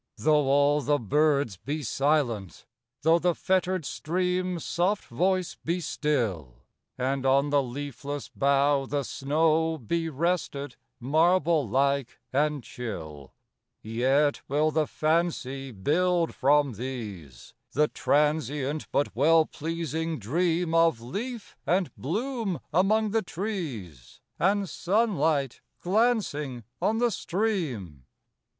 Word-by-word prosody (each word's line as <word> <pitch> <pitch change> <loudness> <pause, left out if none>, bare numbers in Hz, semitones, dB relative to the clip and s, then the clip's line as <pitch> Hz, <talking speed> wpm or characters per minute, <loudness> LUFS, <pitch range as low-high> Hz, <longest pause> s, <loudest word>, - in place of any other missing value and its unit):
Though 150 +6 +3
all 145 +1 +4
the 145 +2 +2
birds 140 - +1
be 150 - -4
silent,—thoughThe 130 - 0
fettered 185 -2 0
stream's 180 +2 -1
soft 190 +4 0
voice 185 +8 0
be 170 +2 -1
still, 105 - -2 0.3
And 130 +1 -1
on 140 +2 +3
the 145 -1 +4
leafless 140 +2 -5
bough 140 0 +2
the 145 +1 -1
snowBe 160 +2 0
rested, 145 -3 -2 0.2
marble 160 - +2
like 140 +1 0
and 145 -1 +1
chill,—Yet 115 - -3
will 150 +3 +2
the 155 0 +1
fancy 155 -5 -1
build, 165 - +1
from 140 0 +3
these, 105 - -7 0.2
The 150 +2 +3
transient 150 -1 0
but 145 - 0
well 160 +5 +5
pleasing 160 0 -3
dreamOf 165 - +2
leaf 210 - -6
and 180 0 +1
bloom 215 - -2
among 210 +5 +3
the 225 +1 +2
trees, 155 - -6 0.2
And 200 +2 +2
sunlight 165 - 0 0.2
glancing 180 - 0 0.2
on 220 - +1
the 240 0 +2
stream. 155 - -2
150 Hz, 100 wpm, -27 LUFS, 130-175 Hz, 0.3 s, well